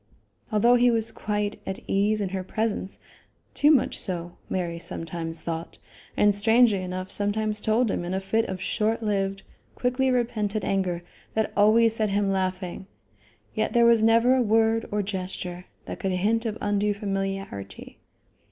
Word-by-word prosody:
Although 235 +3 +4
he 245 +1 +4
was 225 -1 +1
quite 210 0 -3
at 190 - -5
ease 210 +2 +1
in 195 - -1
her 190 0 -3
presence, 205 -1 -3 0.6
too 295 - +4
much 290 -6 +3
so, 175 -2 -3
Mary 170 -2 -2
sometimes 165 -1 -4
thought, 165 0 -5 0.4
and 205 0 +4
strangely 220 0 +4
enough 185 +1 -5
sometimes 210 +1 +1
told 220 +1 +2
him - - -2
in 175 +2 -3
a - - 0
fit 220 +4 0
of 190 -3 -5
short 220 +4 -1
lived, 195 -2 -1 0.3
quickly 255 +1 0
repented 225 -4 -1
anger 180 -3 -1 0.3
that 220 -1 0
always 220 +2 +5
set 215 -1 +1
him 200 0 +1
laughing, 185 -1 -3 0.7
yet 220 0 -1
there 235 0 +5
was 235 -1 +5
never 230 +3 +4
a 260 - +2
word 225 0 +2
or 205 0 0
gesture 185 -2 -5 0.2
that - - -7
could 190 -1 -1
hint 220 +6 +1
of 215 0 -4
undue 205 0 0
familiarity. 195 - -5
205 Hz, 160 wpm, -25 LUFS, 190-225 Hz, 0.7 s, always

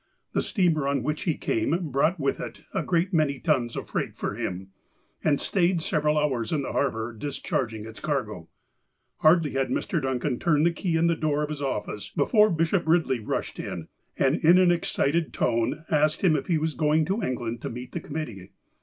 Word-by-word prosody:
The - - +2
steamer 165 -8 +1
on 140 -3 0
which 150 +3 -2
he 165 -5 +1
came 155 +8 -1
brought 155 +7 +2
with 135 -1 0
it - - -7
a - - 0
great 180 +2 0
many 150 -4 +2
tons 130 -7 0
of - - -5
freight - - -3
for - - -3
him, 95 +2 -4 0.5
and 145 -2 +2
stayed 180 -2 +1
several 155 -4 +1
hours 130 -7 0
in 150 -3 0
the - - -4
harbour 115 -4 -1
dis 140 +6 -5
charging 110 -4 -2
its 110 0 -10
cargo. 110 - -3 0.7
Hardly 155 -1 +4
had 135 -1 0
Mr. - - -1
Duncan 130 -1 -1
turned 155 -3 +3
the 170 - +4
key 170 -1 -1
in 165 - +3
the 170 0 +3
door 150 -1 0
of 150 - -3
his 150 -2 -5
office 105 -6 -3
before 215 -2 +4
Bishop 165 +1 +1
Eidley 160 -7 +2
rushed - - -3
in, - - -5 0.3
and 135 +3 +3
in 170 +3 +7
an 185 -1 +5
ex 170 -1 0
cited 160 +3 0
tone 115 +7 0
asked 155 +2 +2
him 170 -5 +5
if 140 - -2
he 170 - +2
was 155 0 -1
going 155 +3 +2
to 195 +6 -1
England 120 - -3
to - - -4
meet 125 +2 -7
the - - -3
committee. 120 -12 -6
150 Hz, 205 wpm, -26 LUFS, 130-165 Hz, 0.7 s, in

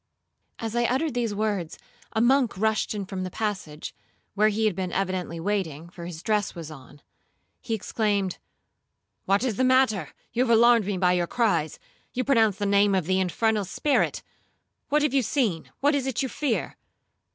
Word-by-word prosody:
As 225 0 -4
I 240 0 +2
uttered 265 +5 0
these 235 -4 -1
words, 200 -6 -2 0.3
a 220 - 0
monk 250 -3 +3
rushed 220 +1 0
in 200 -2 -3
from 190 -1 -5
the 185 - -3
passage, 190 -8 -4 0.4
(where 215 +2 +3
he 220 +1 0
had 210 -4 +1
been 185 -1 -3
evidently 185 -3 -2
waiting, 170 -4 -2
for 170 -1 -8
his 170 0 -8
dress 210 -3 0
was 165 -2 -7
on). 140 0 -14 0.6
He 225 - -2
exclaimed, 205 -3 -1 0.9
'What 200 +4 +2
is 235 -6 -1
the - - +2
matter? 255 - +3 0.2
You 240 - +1
have 235 -3 +4
alarmed 235 -3 +5
me 200 -2 -1
by 180 -1 +3
your 175 -1 +1
cries,—you 215 +3 -2
pronounced 225 -7 +3
the 205 - -2
name 200 0 +4
of 185 -4 0
the 185 +2 +1
infernal 210 +3 +1
spirit,—what 295 - -2
have 300 -3 +1
you 275 - +4
seen? 220 - -1
what 290 +2 +3
is 275 -2 0
it 265 0 -1
you 265 - -2
fear?' 270 -4 -2
210 Hz, 175 wpm, -26 LUFS, 185-235 Hz, 0.9 s, alarmed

